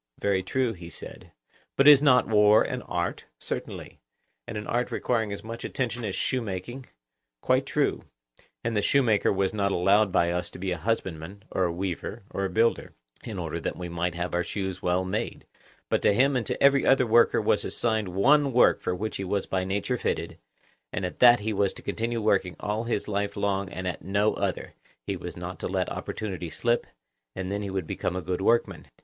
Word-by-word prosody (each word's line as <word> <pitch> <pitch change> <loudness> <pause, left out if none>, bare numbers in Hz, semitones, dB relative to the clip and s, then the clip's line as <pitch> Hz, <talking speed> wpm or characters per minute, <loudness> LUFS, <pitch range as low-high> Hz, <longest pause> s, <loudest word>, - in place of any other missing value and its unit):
Very 100 -2 +1
true, 120 +5 0
he 85 -3 -10
said. - - -10 0.4
But 135 - +4
is 145 -2 +9
not 130 -4 +5
war 105 0 +5
an 125 -1 -3
art? 85 -5 -3
Certainly. - - -6 0.5
And 110 - -5
an 105 - -5
art 120 +1 -1
requiring 110 -4 -1
as 100 - -6
much 115 +1 -7
attention 120 -2 -3
as 100 -4 -3
shoemaking? 120 +1 -3 0.5
Quite - - +2
true. - - 0 0.6
And 115 -1 -1
the 105 - +2
shoemaker 115 -3 +3
was 95 0 0
not 100 -2 0
allowed 100 +3 +3
by 85 -1 +2
us 90 0 -2
to - - -11
be 95 +1 -3
a 90 - -1
husbandman, 95 -2 -3
or 95 - +1
a 85 - 0
weaver, 95 +4 -4
or 100 - -2
a - - -1
builder—in 90 - -2
order - - -3
that - - -3
we 90 -1 -5
might 85 0 -2
have 90 +1 -3
our 90 0 +1
shoes 95 -1 -4
well 90 +1 +1
made; 95 - -3 0.4
but - - +1
to - - +4
him 135 +3 +3
and 115 -5 -1
to - - -2
every 140 0 +5
other 135 -1 +4
worker 115 +1 +4
was - - +1
assigned 110 -3 -1
one 140 +11 +3
work 125 - +5
for 90 - -1
which 110 +4 -4
he 95 - -4
was 95 +1 -1
by 95 -1 -1
nature 100 +6 -1
fitted, - - -3 0.5
and 95 - -2
at 90 - -6
that 120 -2 +7
he 110 +1 -1
was 100 -1 +1
to - - -11
continue 115 +1 -2
working 100 -5 +1
all 105 +2 -2
his 115 -3 -2
life 100 -1 -2
long 100 -1 -1
and 90 -1 -5
at 90 - -4
no 100 +3 +1
other; - - -3 0.3
he - - -2
was - - -7
not - - -6
to - - -3
let - - -1
opportunities 90 -6 -5
slip, 120 0 +1 0.5
and 95 0 -4
then 100 +1 -2
he 100 - -4
would 95 -3 -3
become 90 - -3
a 90 - -2
good 90 +3 -2
workman. 115 +4 +1
100 Hz, 205 wpm, -27 LUFS, 95-115 Hz, 0.6 s, is